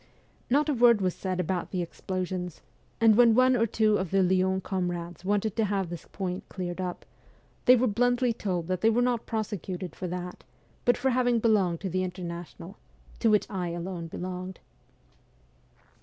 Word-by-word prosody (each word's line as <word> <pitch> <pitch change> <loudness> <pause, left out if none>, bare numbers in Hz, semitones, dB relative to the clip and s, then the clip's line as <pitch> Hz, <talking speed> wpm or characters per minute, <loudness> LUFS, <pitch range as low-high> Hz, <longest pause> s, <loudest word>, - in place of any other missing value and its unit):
Not 285 +4 +3
a 300 - +2
word 235 -3 +5
was 185 -2 0
said 185 -1 -3
about 180 0 -1
the 180 -2 -2
explosions; 180 0 -4 0.4
and 225 -2 +6
when 235 -1 +6
one 255 +1 +5
or 230 -1 +2
two 215 0 +2
of 185 -2 -2
the 195 +1 +3
Lyons 190 +1 +2
comrades 175 -3 -3
wanted 205 +2 0
to 225 - +3
have 195 -3 -1
this 175 - -7
point 185 -2 -4
cleared 180 -1 -4
up, 180 -1 -5 0.6
they 250 - +8
were 250 +1 +2
bluntly 245 +2 +2
told 180 -6 -2
that 185 +1 -2
they 225 - +5
were 235 +2 +2
not 245 -2 0
prosecuted 200 -5 -4
for 185 - -5
that, 180 0 -6 0.4
but 245 - +4
for 265 +2 +1
having 245 -1 +2
belonged 205 -7 +2
to 190 - -3
the 185 +1 0
International 175 +1 -7 0.4
to 230 - +3
which 210 -1 +3
I 185 -3 -3
alone 170 -1 -5
belonged. 185 +2 -6
190 Hz, 175 wpm, -28 LUFS, 180-225 Hz, 0.6 s, they